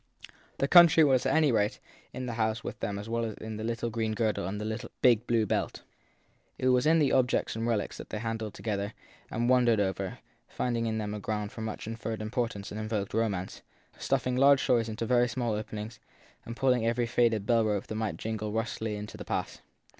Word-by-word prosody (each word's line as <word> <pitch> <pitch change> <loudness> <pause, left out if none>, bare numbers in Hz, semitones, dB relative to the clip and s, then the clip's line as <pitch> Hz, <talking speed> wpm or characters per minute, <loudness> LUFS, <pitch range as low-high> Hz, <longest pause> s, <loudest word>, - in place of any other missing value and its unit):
The 135 - +1
country 170 -1 +8
was 135 -3 +3
at 135 - +2
any 155 -3 +4
rate 105 -2 +1 0.3
in 130 0 -5
the 120 - -3
house 110 -1 -1
with - - -6
them 100 - -3
as 105 +2 -6
well 115 0 -1
as 110 -2 -3
in 110 -1 -7
the 110 - -5
little 115 +1 -2
green 110 -1 -1
girdle 110 -6 0
and 105 +2 -4
in 105 - -3
the 110 +1 -5
big 120 -2 +4
blue 115 -2 +2
belt. - - -2 0.7
It 130 - +1
was 125 +2 +3
in 165 +1 +5
the 150 -3 +3
objects 125 -4 +2
and 115 +1 -2
relics 115 -3 -1
that - - -9
they - - -4
handled 110 -1 -4
together 100 -1 -3 0.3
and 120 +2 -1
won 125 -1 +4
dered 115 -2 +4
over, 95 -1 -1 0.3
finding 115 -2 -1
in 110 0 -1
them 105 -1 -3
a 105 - -4
ground 105 0 -3
for 120 - -8
much 110 -1 -5
inferred 115 0 -4
impor 115 +2 -1
tance 100 -3 -8
and 105 - -5
invoked 110 -2 -3
romance, 105 -5 -1 0.4
stuffing 125 0 0
large 135 +1 +5
stories 120 -3 +2
into 110 +1 -3
very 120 +1 +3
small 120 -1 -2
openings 105 +1 -5 0.5
and 115 +1 -6
pulling 125 -3 +2
every 115 +1 +1
faded 115 -3 +2
bell 115 0 +3
rope 105 -2 0
that - - -6
might 110 -1 -2
jingle 110 -1 -3
rustily 110 -1 -2
into 105 0 -7
the - - -7
past. - - -3
115 Hz, 220 wpm, -29 LUFS, 105-120 Hz, 0.7 s, country